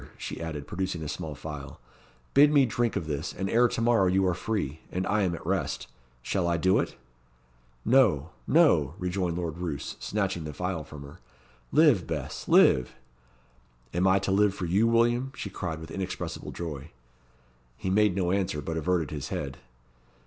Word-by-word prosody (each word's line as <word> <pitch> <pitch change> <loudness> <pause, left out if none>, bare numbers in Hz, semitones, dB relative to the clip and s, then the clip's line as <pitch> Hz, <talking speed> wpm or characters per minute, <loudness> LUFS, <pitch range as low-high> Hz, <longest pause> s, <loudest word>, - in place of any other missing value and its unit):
she - - -6
added, 80 -3 -5
producing 95 -3 -3
a - - -4
small 75 0 -5
phial. 75 -1 -8 0.5
"Bid 145 +2 +7
me 140 -3 +5
drink 120 -1 0
of 85 - -2
this, 75 +1 -3
and 95 - -3
ere 120 +4 +4
to 115 - -3
morrow 115 -5 +4
you 95 +1 +3
are 90 - +2
free, 90 -5 -3
and 95 +1 -2
I 105 +1 +1
am 90 -3 +1
at - - -10
rest. - - -1 0.4
Shall 90 +5 0
I 85 -1 +1
do 95 +3 +3
it?" - - -2 0.9
"No 105 - +4 0.2
no," 85 - +4
rejoined 90 -2 -2
Lord 85 -1 -4
Roos, 80 -6 -4
snatching 95 -5 -2
the 75 -1 -6
phial 90 -2 -3
from 75 -1 -10
her. 70 +1 -12 0.5
"Live, - - +4
Bess, - - -5
live!" 65 -1 +5 1.0
"Am 90 +2 +2
I 95 +1 +5
to 95 0 -1
live 100 0 +3
for 90 - -3
you, 100 +7 +3
William?" 120 +3 +2
she - - -6
cried, 85 -4 -4
with 80 0 -9
inexpressible 95 -1 -5
joy. 80 -3 -6 0.9
He 95 - -3
made 105 -1 +3
no 90 -2 0
answer, 95 -6 0
but 80 +2 -4
averted 80 -2 0
his 75 -4 -4
head. - - -4
90 Hz, 180 wpm, -28 LUFS, 80-100 Hz, 1.0 s, Bid